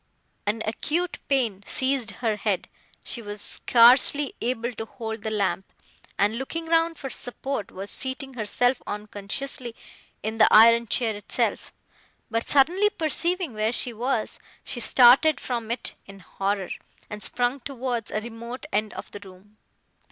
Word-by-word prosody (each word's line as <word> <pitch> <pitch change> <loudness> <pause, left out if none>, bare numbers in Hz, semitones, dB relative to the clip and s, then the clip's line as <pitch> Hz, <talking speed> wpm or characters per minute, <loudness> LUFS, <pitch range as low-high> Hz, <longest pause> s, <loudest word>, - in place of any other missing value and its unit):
An 220 +2 0
acute 325 +10 -2
pain 240 -9 +1
seized 260 -4 0 0.2
her 220 -2 +2
head, 205 -3 -1 0.4
she 235 - -3
was 205 -1 -6
scarcely 255 +6 +4
able 240 0 -2
to 225 - -6
hold 220 -1 -6
the 220 - -3
lamp, 200 -2 -1 0.5
and, 210 +3 +2
looking 325 +5 -4
round 330 0 +2
for 270 -2 -6
support, 245 -3 -4
was 195 +2 0
seating 265 +1 -4
herself, 245 +2 0
unconsciously, 210 +4 -4 0.5
in 220 +2 -3
the 215 - +7
iron 230 +2 +7
chair 225 -1 0
itself; 205 - -2 0.6
but 230 0 -1
suddenly 350 +9 +4
perceiving 340 - -1
where 215 +1 0
she 245 0 +2
was, 235 0 -2 0.2
she 240 - -6
started 255 +6 +6
from 235 -3 -4
it 235 +1 -3
in 195 0 -11
horror, 195 0 -3 0.4
and 210 0 -8
sprung 245 +2 +2
towards 250 -4 -3
a 215 - -2
remote 235 +3 -8
end 215 +1 0
of - - -8
the 205 - -8
room. 200 +2 -16
235 Hz, 145 wpm, -25 LUFS, 215-265 Hz, 0.6 s, the